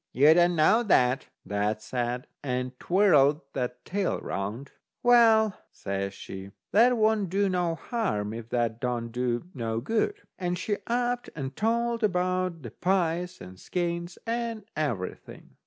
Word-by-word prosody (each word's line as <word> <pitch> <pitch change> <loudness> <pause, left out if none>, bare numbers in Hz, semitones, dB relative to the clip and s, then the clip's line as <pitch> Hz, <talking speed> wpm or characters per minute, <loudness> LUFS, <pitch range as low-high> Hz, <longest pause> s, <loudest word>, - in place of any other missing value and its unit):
"You 145 +5 +7
don't 175 +1 +4
know 165 +9 +5
that," 130 - +3 0.2
that 105 +1 -1
said, 125 0 -2 0.2
and 125 -2 -2
twirled 155 -6 +4
that's 125 -2 -2
tail 195 -1 -1
round. 105 +8 -4 0.3
"Well," 225 -4 +5
says 100 0 -4
she, 95 0 -8 0.2
"that 240 +4 +5
won't 215 -3 +2
do 200 +2 +2
no 180 -3 0
harm, 165 - -2
if 115 0 -7
that 120 -1 -1
don't 120 -2 -2
do 120 0 -1
no 115 -3 -2
good," 225 - 0 0.2
and 180 -1 -1
she 205 +2 -1
upped 245 +1 0
and 135 -2 -5
told 235 +1 0
about 185 -4 0
the 120 - -7
pies, 180 -1 0
and 95 0 -10
the - - -17
skeins, 170 0 -3
and 230 -1 -2
everything. 120 -12 -4
170 Hz, 145 wpm, -27 LUFS, -, 0.3 s, You